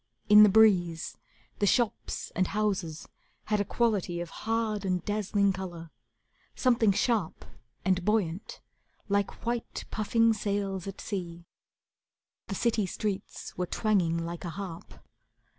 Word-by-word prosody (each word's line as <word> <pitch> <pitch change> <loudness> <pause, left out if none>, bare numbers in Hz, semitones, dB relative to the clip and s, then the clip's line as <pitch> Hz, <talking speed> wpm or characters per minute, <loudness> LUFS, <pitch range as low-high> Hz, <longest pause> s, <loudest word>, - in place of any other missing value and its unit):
In 210 0 +10
the 210 - +9
breeze 185 -6 +3 0.4
The 205 - +2
shops 235 +1 0
and 185 0 +2
houses 190 -7 -2 0.4
had 210 -1 0
a - - +2
quality 205 -6 0
Of 170 -1 -5
hard 225 -2 -1
and 180 -2 -1
dazzling 205 -1 +1
colour; 175 -4 -7 0.6
something 235 -5 +3
sharp 215 -3 0 0.4
And 185 -1 +2
buoyant, 195 -3 -1 0.5
like 200 +2 -1
white, 235 0 -3
puffing 225 +1 +3
sails 200 -3 -2
at 195 - -7
sea. 175 -4 -5 1.0
The 195 - -4
city 220 -2 +1
streets 200 +1 -4
were 180 0 -2
twanging 185 -7 +1
like 170 +1 -4
a 175 - -4
harp. 175 -1 -8
200 Hz, 125 wpm, -29 LUFS, 175-215 Hz, 1.0 s, In